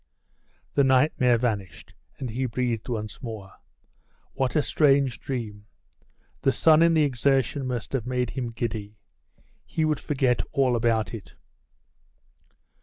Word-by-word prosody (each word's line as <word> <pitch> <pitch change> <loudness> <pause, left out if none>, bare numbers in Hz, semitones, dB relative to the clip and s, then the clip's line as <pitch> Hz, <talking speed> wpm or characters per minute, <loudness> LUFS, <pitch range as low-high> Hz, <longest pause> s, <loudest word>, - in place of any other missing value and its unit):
The 140 - +4
nightmare 130 -2 +3
vanished, 110 -6 -3 0.2
and 125 -3 -5
he 130 +3 -1
breathed 120 -1 -2
once 110 -1 -4
more. 110 -6 -7 0.8
What 130 +2 -1
a 150 - +3
strange 140 -4 +3
dream! 105 -6 -5 0.7
The 135 - +3
sun 155 +3 +5
and 165 -1 +5
the 155 - +5
exertion 135 0 +1
must 125 -1 -4
have 125 -3 -1
made 125 -2 -1
him 125 -3 -3
giddy. 110 -2 -4 0.7
He 160 - -1
would 155 -1 0
forget 130 -4 +1
all 130 -3 +2
about 115 -4 +1
it. 110 -4 -9
125 Hz, 130 wpm, -26 LUFS, 115-135 Hz, 0.8 s, sun